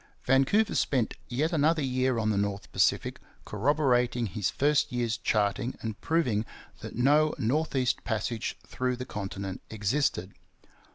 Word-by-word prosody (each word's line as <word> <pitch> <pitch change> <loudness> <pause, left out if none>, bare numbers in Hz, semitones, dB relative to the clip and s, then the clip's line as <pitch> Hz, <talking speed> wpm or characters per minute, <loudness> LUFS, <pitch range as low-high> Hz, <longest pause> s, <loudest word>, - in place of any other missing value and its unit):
Vancouver 135 - +3
spent 125 -5 +1
yet 150 +7 -1
another 155 0 +2
year 130 -1 +1
on 110 -1 +1
the - - 0
North 100 -1 -3
Pacific, - - +1 0.3
corroborating 125 0 +1
his 100 0 -1
first 145 0 +2
year's 120 -3 0
charting 110 +2 0
and 110 -2 -5
proving 140 -11 +1 0.4
that - - -8
no 145 +6 +3
north 145 +7 0
east 130 -1 +1
passage 110 0 -2
through 125 0 -2
the 125 +1 -6
continent 95 -3 -5
existed. 105 -2 -1
125 Hz, 135 wpm, -28 LUFS, 110-140 Hz, 0.4 s, Vancouver